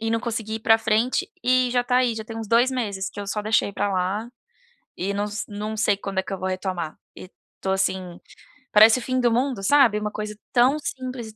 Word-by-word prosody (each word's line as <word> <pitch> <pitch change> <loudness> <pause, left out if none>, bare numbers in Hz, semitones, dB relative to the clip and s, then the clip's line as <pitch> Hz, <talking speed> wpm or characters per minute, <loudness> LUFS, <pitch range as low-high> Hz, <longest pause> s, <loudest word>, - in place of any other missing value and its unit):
e 225 0 -2
não 230 - +1
consegui 225 -2 -4
ir - - -8
para 225 0 +5
frente 225 +2 0
e 255 0 +3
já 245 0 +2
está 250 +1 +2
aí, 245 -2 +2
já 220 - -5
tem 225 0 -8
uns 220 -2 -6
2 235 +3 +4
meses 205 -7 -3
que 205 - -8
eu 200 - -6
só 210 - -2
deixei 215 -1 +1
pra 200 0 -1
lá 190 +4 -1 0.7
e 200 +2 -3
não 205 +1 -1
se 210 0 -4
não 210 +1 -5
sei 210 -2 +2
quando 195 -1 -3
é 190 - -1
que - - -9
eu 195 - -2
vou 185 - -2
retomar. 185 -4 -3 0.2
E - - -10 0.3
tô 190 - -2
assim, 190 -2 -1 0.5
parece 220 +3 +7
o - - -4
fim 255 +2 -1
do 240 -2 +3
mundo 250 -2 0
sabe, 235 -3 +4
uma 210 - -2
coisa 210 0 -5 0.2
tão 255 +4 +4
simples 255 -4 -5
e 220 - -13
220 Hz, 245 wpm, -24 LUFS, 200-240 Hz, 0.7 s, parece